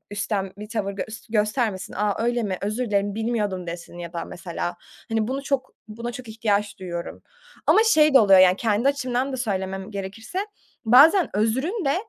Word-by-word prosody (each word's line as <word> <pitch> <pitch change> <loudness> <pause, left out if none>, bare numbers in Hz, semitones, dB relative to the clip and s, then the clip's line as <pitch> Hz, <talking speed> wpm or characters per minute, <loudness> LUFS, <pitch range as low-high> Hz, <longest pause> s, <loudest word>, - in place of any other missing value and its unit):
üstten 205 -2 -2
bir 210 0 -8
tavır 210 -3 -2
gös 220 +3 -7
göstermesin, 215 -2 0
"A, 210 +1 0
öyle 240 0 +1
mi, 190 -3 -2
özür 215 +5 -2
dilerim, 200 -1 0
bilmiyordum." 210 -5 -2
desin 175 +1 -8
ya 170 0 -7
da 170 - -4
mesela. 175 0 -5 0.3
Hani, 225 0 0
bunu 270 +1 -3
çok 270 -2 -2 0.2
buna 235 +3 -6
çok 250 -2 -9
ihtiyaç 210 -2 -1
duyuyorum 175 -2 -6 0.4
ama - - +5
şey 305 -9 +4
de - - +10
oluyor, 195 -3 +7
yani, 185 0 +6
kendi 225 +3 +1
açımdan 260 -1 -1
da 260 - -2
söylemem 195 -3 -3
gerekirse, 205 - -6 0.5
bazen 305 - +6
özrün 265 - 0
de, 275 - +2
215 Hz, 175 wpm, -24 LUFS, 195-250 Hz, 0.5 s, de